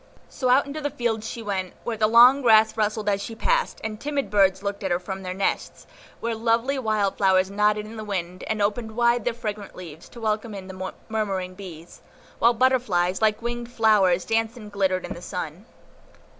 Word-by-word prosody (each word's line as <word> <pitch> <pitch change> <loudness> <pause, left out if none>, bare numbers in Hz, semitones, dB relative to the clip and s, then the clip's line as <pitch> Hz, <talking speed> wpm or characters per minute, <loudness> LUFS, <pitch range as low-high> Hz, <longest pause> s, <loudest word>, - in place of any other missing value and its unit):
So 255 - -1
out 260 +4 +5
into 290 +2 -6
the 290 - -1
fields 230 -5 -2
she 230 - -6
went, 190 -3 -3
where 235 - -2
the 215 0 +2
long 245 +5 +7
grass 220 -3 +5
rustled 215 -1 -1
as 200 -1 +1
she 225 - -6
passed, - - 0
and 215 -1 -5
timid 280 -8 -2
birds 195 -1 +3
looked 200 +1 -4
at 190 - -1
her 175 - +2
from 190 +2 -6
their 185 -1 -5
nests; 195 0 -2 0.4
where 235 0 -1
lovely 230 +4 +1
wild 215 -5 0
flowers 190 -1 +3
nodded 210 +1 +1
in 220 +1 -10
the 215 - -5
wind, 185 -3 -4
and 215 -2 0
opened 220 +2 -2
wide 235 -1 +2
their 245 -2 0
fragrant 210 -3 -6
leaves, 165 -3 -10
to 235 - -12
welcome 215 -1 -2
in 190 -1 -7
the 185 0 -6 0.2
murmuring 195 -4 -2
bees, 175 -4 -11 0.4
while 235 +1 +4
butterflies, 220 -8 +2
like 215 +1 +2
winged 240 0 -4
flowers, 205 -6 +3
danced 225 +1 0
and 210 -3 -10
glittered 190 -2 0
in - - -5
the 175 - -10
sun. 180 +2 -6
215 Hz, 200 wpm, -24 LUFS, 190-235 Hz, 0.4 s, long